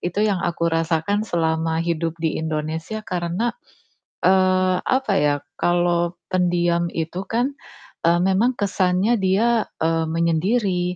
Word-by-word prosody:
Itu 180 +4 -1
yang 205 -3 +1
aku 170 -1 -2
rasakan 165 +6 0
selama 160 -1 0
hidup 165 -1 -2
di 160 -1 -2
Indonesia 160 +7 -4
karena, 180 +3 -2 0.7
eee, 185 0 +3
apa 260 -5 0
ya, 145 -1 +3 0.3
kalau 175 0 +1
pendiam 175 -1 +1
itu 165 +2 -4
kan, 245 +5 0 0.5
eee, 170 +1 +3
memang 200 +7 +2
kesannya 195 +2 +1
dia, 215 +4 +2 0.2
eee, 165 0 +1
menyendiri, 180 +3 0
175 Hz, 120 wpm, -22 LUFS, 165-200 Hz, 0.7 s, eee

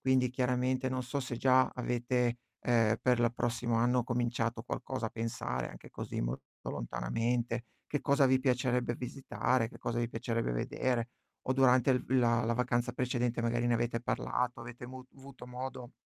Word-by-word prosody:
Quindi 130 -1 +3
chiaramente 130 0 +1
non 130 0 -1
so 125 +3 -2
se 130 -2 -4
già 130 +1 +4
avete, 120 0 0 0.2
ehm, 115 -3 +3
per 125 -1 +3
l 115 - +4
prossimo 120 0 0
anno 125 +2 +3
cominciato 120 -1 -1
qualcosa 125 -1 -3
a - - -5
pensare, 110 - -3
anche - - -12
così, - - -4
molto - - -3 0.3
lontanamente, 115 - -1 0.2
che 145 - -1
cosa 140 -1 +4
vi 130 0 +4
piacerebbe 125 -2 +1
visitare, 130 -2 0
che - - -13
cosa 120 0 -1
vi 120 - 0
piacerebbe 115 - -1
vedere. 120 - -1 0.4
O - - +4
durante 130 0 +5
il 125 - +2
v - - -21
la 120 -2 +4
la 115 - +1
vacanza 120 0 +1
precedente 125 -1 0
magari 120 +1 +1
ne 120 - +3
avete 115 0 0
parlato, 125 0 -1
avete 120 +1 -8
mu 130 0 -9
avuto 135 -2 -12
modo 125 0 -6
125 Hz, 170 wpm, -32 LUFS, 115-130 Hz, 0.4 s, durante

